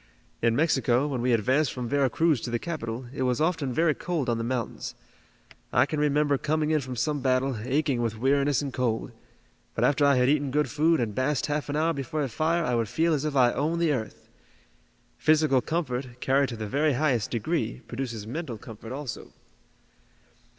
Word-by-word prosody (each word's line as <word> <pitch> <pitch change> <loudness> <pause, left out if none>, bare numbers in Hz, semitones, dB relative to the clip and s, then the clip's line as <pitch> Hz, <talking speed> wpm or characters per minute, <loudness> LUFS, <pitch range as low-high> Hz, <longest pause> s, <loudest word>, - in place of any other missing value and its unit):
In 115 0 +2
Mexico, 135 -3 +2
when 130 -5 -2
we 125 +1 +1
advanced 130 +6 +2
from 125 -2 -4
Vera 140 0 +2
Cruz 160 -6 +2
to - - -4
the 120 - 0
capital, 125 -5 -5
it 140 - -5
was 125 -1 +1
often 160 -4 0
very 160 +4 +2
cold 155 -5 -2
on 115 -1 0
the - - -2
mountains. 120 -1 -3 0.8
I 120 - +4
can 155 +1 -3
remember 145 -1 +2
coming 155 0 0
in 155 -1 +2
from 130 -1 -6
some 145 +4 -1
battle, 130 0 +1
aching 135 0 0
with 115 -2 -2
weariness 140 +3 +2
and 140 -3 -4
cold, 120 -3 -1 0.6
but - - 0
after 145 +1 +3
I 140 -1 +5
had 125 0 +3
eaten 145 0 +2
good 150 +3 0
food 160 +2 +3
and 115 -4 -1
basked 130 +3 0
half 150 0 -2
an 145 - -2
hour 160 +2 +2
before 145 +2 -3
a 135 - -2
fire 165 +7 0
I 125 - 0
would 115 -2 0
feel 160 +7 +1
as 150 -1 -1
if 150 -2 -2
I 125 -2 +4
owned 160 +4 0
the 165 -3 +2
earth. 110 -5 -5 0.9
Physical 155 -4 +3
comfort, 125 -5 -3
carried 135 +1 +2
to 115 - -6
the 110 - -4
very 145 +7 +1
highest 125 -6 +1
degree, 120 0 -2
produces 120 -4 -5
mental 130 0 -5
comfort 115 +2 -10
also." 135 -3 -6
135 Hz, 200 wpm, -27 LUFS, 120-150 Hz, 0.9 s, I